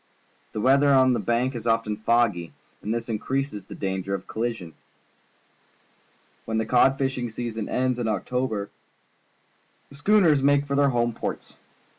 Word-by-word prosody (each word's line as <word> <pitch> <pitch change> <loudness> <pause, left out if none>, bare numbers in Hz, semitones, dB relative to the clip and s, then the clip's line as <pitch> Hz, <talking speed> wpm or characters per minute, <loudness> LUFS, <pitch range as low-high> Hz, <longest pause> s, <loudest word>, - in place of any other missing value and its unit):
The - - -3
weather 140 +4 +4
on 130 -1 +5
the - - 0
Banks 120 +3 0
is 120 0 -5
often 115 -2 +1
foggy, 110 -6 +1 0.3
and 105 - -4
this 115 0 -2
increases 130 +1 -3
the - - -9
danger 95 0 -2
of 95 - -7
colli 120 +2 -2
sion. 90 -8 -10 1.7
When 110 - -2
the 110 - 0
cod 130 +2 +4
fishing 130 -3 -2
season 115 -1 -5
ends 125 -1 0
in 120 - -1
October, 110 -2 -2 1.2
the 140 - -14
schooners 160 -2 +4
make 145 +1 +3
for 140 - -4
their 140 0 +4
home 120 -2 0
ports. - - -6
120 Hz, 155 wpm, -25 LUFS, 110-135 Hz, 1.7 s, on